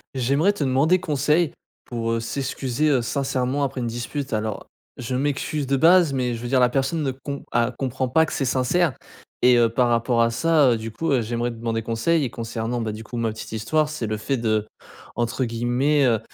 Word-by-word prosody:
J'aimerais 140 +10 +2
te 160 - -3
demander 140 +7 +3
conseil 150 0 +1 0.3
pour, 115 -1 -2
heu, 115 - 0
s'excuser, 135 +3 -1
heu, 135 -4 +3
sincèrement 135 +2 -1
après 135 -1 -2
une 120 - -2
dispute. 120 +3 -4
Alors 110 -1 -3 0.3
je 125 +1 -4
m'excuse 145 +2 -1
de 135 +1 +1
base 170 +1 +5
mais 125 -2 -1
je 115 - -8
veux 120 - -5
dire 130 0 +3
la 125 - +5
personne 135 +5 -1
ne 135 - 0
com 140 +2 -6
a 120 +1 +2
comprend 130 +1 -3
pas 160 +5 +4
que - - -6
c'est - - -1
sincère 130 +4 +1 0.5
et 125 0 +6
heu, 115 -1 +4
par 120 +2 +2
rapport 120 0 +2
à 115 0 +3
ça, 145 +2 +3
heu, 115 - +1
du 110 0 -6
coup, 160 +8 -2
heu, 130 - +3
j'aimerais 120 +2 -2
demander 115 -1 -3
conseil. 120 +9 +1
Et - - -3
concernant 115 +1 -3
du 110 0 -4
coup, 120 - -9
ma 115 -1 0
petite 110 - -9
histoire 150 +8 +1
c'est 150 -7 -4
le 110 0 -2
fait 135 +6 -1
de 110 -2 0 0.5
entre 120 +2 -1
guillemets 120 +5 +1
heu, 115 -3 +3
125 Hz, 215 wpm, -23 LUFS, 115-140 Hz, 0.5 s, et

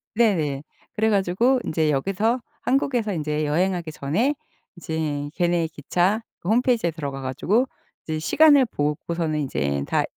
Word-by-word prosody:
네네. 160 -12 +1 0.3
그래 220 +1 +1
가지고 205 +6 +2
인제 155 -1 +1
여기서 200 - 0 0.2
한국에서 250 -5 0
인제 150 -2 -1
여행하기 170 +2 0
전에 165 - 0 0.4
이제 155 -4 -3
걔네 175 -1 +1
기차 175 +7 0 0.2
그 175 - -5
홈페이지에 235 -5 +2
들어가 140 -4 -5
가지고 195 - +1 0.4
이제 160 -1 -3
시간을 285 - +5
보고서는 155 -2 -2
이제 70 - -1
다 - - +1
170 Hz, 320 characters per minute, -23 LUFS, 150-220 Hz, 0.4 s, 시간을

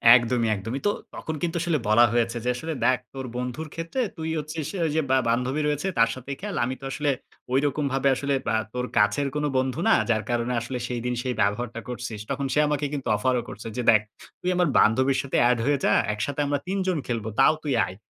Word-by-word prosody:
একদমই, 120 -1 +2
একদমই। 115 +7 -4
তো - - +4 0.2
তখন 160 - -4
কিন্তু 170 0 -1
আসলে 170 -3 +1
বলা 120 +3 +6
হয়েছে 120 0 +1
যে - - +2
আসলে 160 +4 -4
দেখ, 130 -2 +4
তোর 135 -1 -5
বন্ধুর 125 +5 -4
ক্ষেত্রে 165 +10 -4 0.2
তুই 160 0 -3
হচ্ছিস, 155 0 -4
অ্যা 170 - 0
ওই - - -2
যে 160 - +3
বা 130 - +5
বান্ধবী 125 +5 0
রয়েছে, 150 +5 -1
তার 115 - +5
সাথেই 135 +2 -6
খেল। 205 -3 -4
আমি 130 +1 -3
তো - - -7
আসলে 145 0 -1 0.4
ঐরকম 140 +2 +1
ভাবে 135 +1 +1
আসলে 140 +2 -1 0.2
আ - - +3 0.2
তোর 125 0 -2
কাছের 105 +7 +3
কোনো 150 0 0
বন্ধু 130 +3 0
না। 225 - +6 0.2
যার 110 -2 +2
কারণে 120 +1 0
আসলে 125 +2 -4
সেইদিন 125 0 -2
সেই 125 -1 -1
ব্যবহারটা 115 +3 -1
করছিস। 120 -3 -5
তখন 140 0 -1
সে 150 - +3
আমাকে 145 0 0
কিন্তু 140 -2 -4
অফারও 125 +2 +1
করছে 110 - -8
যে - - 0
দেখ, 110 -1 +5 0.4
তুই 180 - -1
আমার 180 -2 +3
বান্ধবীর 130 +5 +4
সাথে 135 - -2
এড 125 - +3
হয়ে 145 0 +3
যা, - - +4 0.2
একসাথে 130 +7 -3
আমরা 145 0 0
৩ 195 +2 -1
জন 180 -4 +1
খেলব, 115 -3 -2
তাও 135 - +6
তুই 145 -3 0
আয়। 90 - -8
130 Hz, 220 wpm, -25 LUFS, 120-150 Hz, 0.4 s, বলা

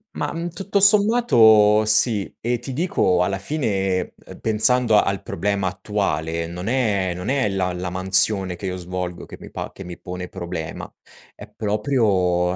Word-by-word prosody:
Ma, - - -3
mhmm, 170 +1 -5
tutto 195 +4 -2
sommato, 120 - +4
sì 110 -1 +4
e 120 0 -2
ti 125 - -6
dico, 95 - 0
alla 95 +1 -2
fine, 95 - -2
uhm - - -12
pensando 115 +1 +3
al 100 0 -3
problema 100 -1 -2
attuale, 85 -5 -3
non 90 +4 -7
è 105 -8 0
non 90 +6 -6
è 135 -6 0
la 95 -2 -2
la 90 +1 -5
mansione 95 0 +3
che 95 - -7
io 90 - -4
svolgo 90 0 -6
che - - -12
mi - - -12
pa - - -7
che 95 - -10
mi 90 -1 -9
pone 90 0 -7
problema. 85 -3 -7 0.5
È - - -13
proprio, 100 -5 0
100 Hz, 165 wpm, -21 LUFS, 90-120 Hz, 0.5 s, sommato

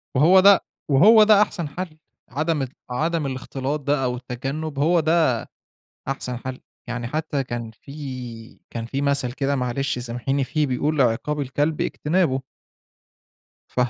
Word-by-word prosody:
وهو 170 +8 +6
ده 200 +1 +7 0.3
وهو 215 +11 +7
ده 210 -1 +6
أحسن 175 -6 0
حل. 160 +1 -6 0.3
عدم 155 +2 -1
ال 130 - -2 0.2
عدم 160 +5 -1
الاختلاط 135 +2 -3
ده 145 -1 0
أو 125 -1 0
التجنب 135 +5 -5
هو 170 +4 +4
ده 160 -2 +3 0.8
أحسن 125 -2 -3
حل. 130 +1 -6 0.3
يعني 120 0 -3
حتى 150 +1 -2
كان 120 -2 -5
في 125 -2 -9
كان 115 -1 -5
في 135 +4 -3
مثل 140 -3 +1
كده 140 +1 -1
معلش 125 +1 -1
سامحيني 125 +3 -2
فيه، 150 +3 0
بيقول 145 +4 0
عقاب 130 +5 +1
الكلب 145 +3 -1
اجتنابه. 150 -4 +1 1.3
فخّ 125 -1 +1
140 Hz, 145 wpm, -23 LUFS, 125-155 Hz, 1.3 s, ده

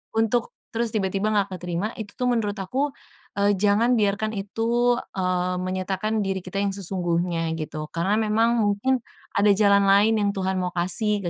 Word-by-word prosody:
Untuk 225 +2 +1 0.2
terus 235 0 0
tiba-tiba 195 +1 0
nggak 200 -1 +1
keterima 180 +3 -3
itu 205 -2 -7
tuh 250 -1 0
menurut 210 -4 0
aku, 260 +9 -2 0.4
eee, 200 0 +3
jangan 210 +4 +3
biarkan 210 +1 +1
itu, 230 +4 0 0.2
eee, 180 -1 -1
menyatakan 190 +4 -1
diri 195 -1 -1
kita 190 +2 -3
yang 200 - 0
sesungguhnya, 175 -3 -1
gitu. 155 0 -5
Karena 185 +5 0
memang 225 +2 +2
mungkin, 205 +6 +1 0.3
ada 200 +1 +2
jalan 200 -1 +4
lain 210 +3 +4
yang 205 -1 +2
Tuhan 190 0 -1
mau 180 -1 -3
kasih 200 +4 0
200 Hz, 160 wpm, -24 LUFS, 185-220 Hz, 0.4 s, jalan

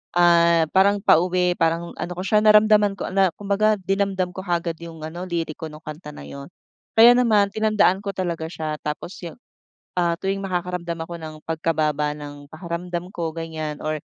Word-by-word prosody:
ah, 170 -1 +5
parang 200 +1 +3
pauwi 180 0 +3
parang 165 +1 0
ano 175 - -4
ko 185 - -4
siya 210 +2 +3
naramdaman 210 -1 +5
ko - - -5
na. 190 -3 +2
Kumbaga 205 +1 +1
dinamdam 195 -1 0
ko 190 - -8
kaagad 170 -1 -1
yung 165 -2 -10
ano 170 +4 -6
liriko 165 -2 -4
nung 155 0 -12
kanta 150 -1 -9
na - - -10
yun. 140 0 -9 0.5
Kaya 230 +2 +9
naman 215 -5 +3
tinandaan 215 -3 +2
ko 200 - -5
talaga 170 -3 -3
siya 155 -2 -4
tapos 150 +4 -5
yung, - - -10 0.6
ah, 170 -1 +2
tuwing 195 +3 -2
makakaramdam 180 -2 -3
ako 170 - -8
ng 155 -1 -7
pagkababa 155 -2 -1
ng 145 -1 -10
pakiramdam 175 +2 -5
ko 165 -2 -4
ganyan 160 -2 -5
or 155 0 -1
175 Hz, 170 wpm, -23 LUFS, 160-195 Hz, 0.6 s, Kaya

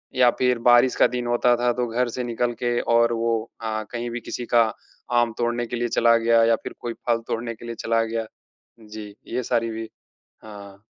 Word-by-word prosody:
या 125 -1 +5
फिर 125 -2 +2
बारिश 120 +1 +5
का - - +5
दिन 125 -1 -4
होता 120 0 +3
था। 120 0 +2
तो 125 0 -1
घर 120 +2 0
से 125 - -1
निकल 120 0 -1
के 120 0 +1
और 115 0 +3
वो 115 0 0 0.3
हाँ, 110 -1 -3
कहीं 120 0 -4
भी 120 - -4
किसी 120 +2 -5
का 115 - +7 0.6
आम 115 -1 0
तोड़ने 120 0 0
के 120 - -4
लिए 120 0 -1
चला 115 0 +5
गया 115 0 +4
या 115 0 +4
फिर - - -6
कोई 120 - -4
फल 115 -1 +2
तोड़ने 115 0 -3
के 115 - -12
लिए 115 - -5
चला 115 0 +2
गया। 115 0 -3 0.6
जी, 105 -1 -10
ये 125 - -2
सारी 115 0 0
भी 110 0 -6 0.6
हाँ। 100 -2 -12
115 Hz, 215 wpm, -23 LUFS, 115-120 Hz, 0.6 s, का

